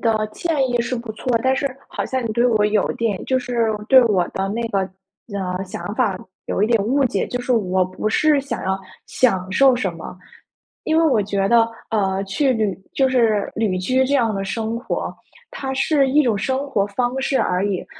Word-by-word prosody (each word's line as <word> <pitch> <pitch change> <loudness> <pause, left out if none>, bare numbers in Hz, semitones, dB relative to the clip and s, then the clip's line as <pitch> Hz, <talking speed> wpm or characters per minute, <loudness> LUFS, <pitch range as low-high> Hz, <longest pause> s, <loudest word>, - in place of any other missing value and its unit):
的 220 -2 +1
建 285 0 0
议 245 -1 +1
是 235 +2 -2
不 235 -2 -5
错， 220 - -14 0.2
但 260 0 +3
是 280 - -1 0.2
好 - - -3
像 260 -1 -2
你 220 - -2
对 240 +2 +2
我 220 -4 +2
有 210 -1 +1
一 - - -4
点 225 -4 -1
就 260 - +1
是 245 -2 -1 0.2
对 260 -1 +8
我 190 -6 +2
的 195 0 -3
那 225 +4 -2
个 200 - 0 0.6
呃， 185 -1 -3
想 205 +1 -6
法 215 -7 +1 0.3
有 200 - -1
一 - - +4
点 230 -4 +3
误 270 +5 +2
解。 205 -6 0
就 245 - -3
是， 245 +1 -1
我 190 -5 +2
不 185 +3 -3
是 295 +5 +3
想 275 +1 -5
要 190 0 0 0.3
享 190 -7 +1
受 265 +6 +5
什 195 -7 -1
么。 165 +2 -9 0.7
因 315 - +1
为 330 - +4
我 245 -9 +3
觉 195 -1 0
得， 230 +1 +5 0.3
呃， 195 -3 0
去 260 +8 +1
旅 215 -6 0 0.2
就 270 - +3
是 230 -5 +2
旅 210 -4 0
居 255 +8 +1
这 280 +2 +1
样 230 -5 +1
的 195 - -2
生 220 +3 -3
活， 240 - -4 0.3
它 265 -1 -5
是 275 0 +2
一 295 +3 +4
种 235 -7 +1
生 265 +6 -1
活 210 -8 +1
方 245 +5 -1
式 270 0 +1
而 180 +2 +1
已。 195 -3 -2
230 Hz, 230 characters per minute, -21 LUFS, 200-260 Hz, 0.7 s, 对